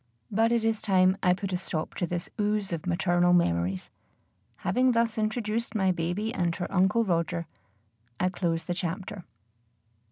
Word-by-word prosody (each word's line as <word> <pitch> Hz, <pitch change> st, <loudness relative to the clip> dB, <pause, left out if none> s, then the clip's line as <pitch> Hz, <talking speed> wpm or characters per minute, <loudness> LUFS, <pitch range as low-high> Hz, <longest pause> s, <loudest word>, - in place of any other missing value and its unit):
But 225 Hz, +3 st, +3 dB
it 235 Hz, -1 st, +2 dB
is 225 Hz, -1 st, 0 dB
time 185 Hz, -2 st, +4 dB
I 180 Hz, -1 st, +4 dB
put 195 Hz, 0 st, -4 dB
a -, -, +2 dB
stop 165 Hz, -3 st, -4 dB
to 175 Hz, -, -2 dB
this 175 Hz, 0 st, -3 dB
ooze 210 Hz, -2 st, 0 dB
of 165 Hz, +1 st, -4 dB
maternal 175 Hz, 0 st, +3 dB
memories. 90 Hz, -, +1 dB, 0.7 s
Having 250 Hz, +7 st, +3 dB
thus 230 Hz, -1 st, +2 dB
introduced 220 Hz, 0 st, -1 dB
my 190 Hz, -3 st, +3 dB
baby 180 Hz, +6 st, -2 dB
and 175 Hz, -7 st, 0 dB
her 175 Hz, -, -3 dB
Uncle 195 Hz, +5 st, +3 dB
Roger, 170 Hz, -2 st, 0 dB, 0.7 s
I 180 Hz, -, +2 dB
close 170 Hz, -3 st, -1 dB
the 175 Hz, -, -2 dB
chapter. 180 Hz, +2 st, -4 dB
185 Hz, 160 wpm, -28 LUFS, 175-215 Hz, 0.7 s, time